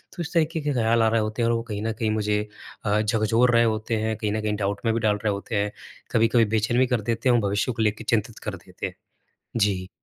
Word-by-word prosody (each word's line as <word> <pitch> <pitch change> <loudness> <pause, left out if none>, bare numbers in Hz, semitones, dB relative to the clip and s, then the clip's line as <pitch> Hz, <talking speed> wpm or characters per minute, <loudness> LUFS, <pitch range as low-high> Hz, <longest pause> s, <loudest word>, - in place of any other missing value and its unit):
तो 175 - -4
इस 160 - -8
तरीक़े 160 -1 +1
के 145 -1 -1
ख़्याल 115 -1 +2
आ - - +4
रहे 115 0 +2
होते 110 +2 -2
हैं 115 - +2
और 120 - +2
वो 115 - -2
कहीं 105 -3 -5
न 115 0 -1
कहीं 110 -2 +1
मुझे 105 -1 0 0.4
अ, 105 +1 +2
झकझोर 115 +3 +2
रहे 115 - +6
होते 110 0 0
हैं 110 0 0
कहीं 105 -1 -2
न 110 - -1
कहीं 105 -1 -1
डाउट 100 0 -2
में 115 - +3
भी 115 - 0
डाल 105 -1 +2
रहे 105 - +3
होते 100 +3 -5
हैं। 105 0 0 0.4
कभी-कभी 115 0 +4
बेचैन 110 +2 +1
भी 130 - +4
कर 125 -3 0
देते 115 +3 0
हैं 120 - +5
और 120 - +3
भविष्य 105 +5 0
को 115 -1 -3
लेकर 105 +1 0
चिंतित 115 0 0
कर - - -3
देते - - -7
हैं। - - -10 0.6
जी। 100 -4 +1
110 Hz, 270 wpm, -25 LUFS, 105-115 Hz, 0.6 s, रहे